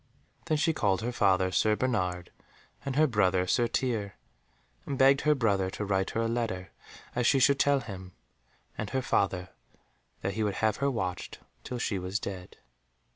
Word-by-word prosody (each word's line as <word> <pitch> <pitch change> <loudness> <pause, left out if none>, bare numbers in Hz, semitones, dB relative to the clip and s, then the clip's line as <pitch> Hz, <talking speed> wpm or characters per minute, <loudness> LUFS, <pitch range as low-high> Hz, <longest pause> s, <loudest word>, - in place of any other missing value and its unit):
Then 155 - +1
she 160 +2 +2
called 100 -7 +1
her 120 - -1
father 95 -5 +2
Sir 105 +3 +3
Bernard, 90 -8 -1 0.5
and 135 -2 -3
her 155 +2 +5
brother 95 -8 +2
Sir 120 +6 +2
Tirre, 110 -6 -1 0.7
and 140 - -2
begged 135 +2 +5
her 150 0 +3
brother 100 -7 +1
to 105 - -4
write 95 -1 0
her - - +2
a 115 - +1
letter 115 -6 -2 0.4
as 120 -1 +2
she - - +4
should 140 +1 +4
tell 140 -1 +3
him, 95 -5 -9 0.6
and 105 - -4
her 130 +2 -1
father 95 -5 0 0.7
that 95 - -2
he 110 - -2
would 105 -2 0
have 110 -2 +1
her 140 +1 +1
watched 95 -8 -3 0.3
till 125 - -5
she 105 -4 -1
was 95 +3 -2
dead. 95 -2 -7
105 Hz, 180 wpm, -29 LUFS, 95-130 Hz, 0.7 s, her